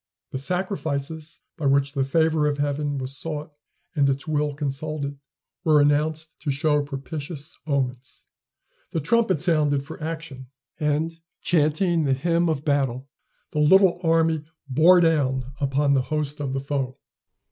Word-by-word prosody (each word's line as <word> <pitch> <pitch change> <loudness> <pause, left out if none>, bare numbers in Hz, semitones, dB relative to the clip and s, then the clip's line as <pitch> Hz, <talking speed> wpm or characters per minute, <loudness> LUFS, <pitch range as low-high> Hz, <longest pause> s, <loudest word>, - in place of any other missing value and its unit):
The 130 - -3
sacrifices 160 -2 -3 0.2
by 155 -5 0
which 140 0 +3
the 135 -2 +1
favor 155 +2 +2
of 145 -1 0
heaven 145 0 -1
was 130 +1 -4
sought, 155 +1 -4 0.4
and 140 -2 +3
its 135 +2 -2
will 150 -1 0
consulted, 145 0 -3 0.4
were 155 -3 +5
announced 155 +2 +1
to 150 - -4
show 150 +1 +2
propitious 145 +1 -6
omens. 130 -3 -2 0.7
The 165 - +1
trumpet 190 0 +2
sounded 150 -5 +2
for 145 - -9
action, 155 -5 -6 0.3
and, 150 +1 +1 0.3
chanting 160 +1 +2
the 135 - +2
hymn 170 +4 +1
of 150 -2 -2
battle, 135 -2 0 0.4
the 150 - -2
little 180 +4 +5
army 165 -2 +2 0.2
bore 165 +7 +6
down 135 -6 +1
upon 140 0 +2
the 135 - +3
host 150 +1 -3
of 140 -2 -2
the 135 - -1
foe. 135 -2 -3
150 Hz, 145 wpm, -24 LUFS, 140-160 Hz, 0.7 s, bore